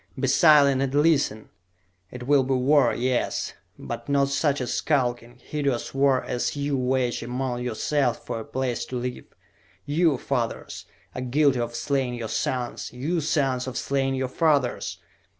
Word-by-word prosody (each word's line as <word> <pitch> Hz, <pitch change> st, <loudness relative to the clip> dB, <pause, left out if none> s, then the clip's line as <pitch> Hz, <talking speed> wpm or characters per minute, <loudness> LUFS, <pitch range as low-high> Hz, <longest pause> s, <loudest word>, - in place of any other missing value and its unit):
"Be 135 Hz, -, +1 dB
silent 140 Hz, -1 st, +5 dB
and 135 Hz, 0 st, -1 dB
listen! 145 Hz, -8 st, +2 dB, 0.6 s
It 125 Hz, +3 st, -8 dB
will 140 Hz, 0 st, +4 dB
be 130 Hz, 0 st, 0 dB
war, 130 Hz, 0 st, +4 dB
yes; 125 Hz, 0 st, -1 dB, 0.2 s
but -, -, -7 dB
not 140 Hz, -1 st, +2 dB
such 145 Hz, 0 st, +1 dB
a 125 Hz, -, -2 dB
skulking, 120 Hz, -3 st, -1 dB
hideous 140 Hz, -2 st, -3 dB
war 135 Hz, -1 st, +3 dB
as 125 Hz, -, -2 dB
ye 145 Hz, 0 st, -2 dB
wage 130 Hz, -2 st, 0 dB
among 125 Hz, +1 st, -3 dB
yourselves 125 Hz, +2 st, 0 dB
for -, -, -5 dB
a -, -, -5 dB
place 130 Hz, 0 st, -2 dB
to 130 Hz, -, -7 dB
live! 125 Hz, 0 st, -4 dB, 0.6 s
You, 155 Hz, -1 st, +2 dB
fathers, 120 Hz, -3 st, -3 dB, 0.3 s
are 130 Hz, -, -5 dB
guilty 135 Hz, +1 st, +2 dB
of 120 Hz, 0 st, -3 dB
slaying 130 Hz, -1 st, -1 dB
your 115 Hz, -2 st, -5 dB
sons! 125 Hz, +2 st, -2 dB
You, 155 Hz, +7 st, -2 dB
sons, 135 Hz, -4 st, 0 dB
of 130 Hz, 0 st, -4 dB
slaying 135 Hz, -1 st, 0 dB
your 130 Hz, 0 st, -1 dB
fathers! 135 Hz, -, +1 dB
130 Hz, 155 wpm, -25 LUFS, 125-140 Hz, 0.6 s, silent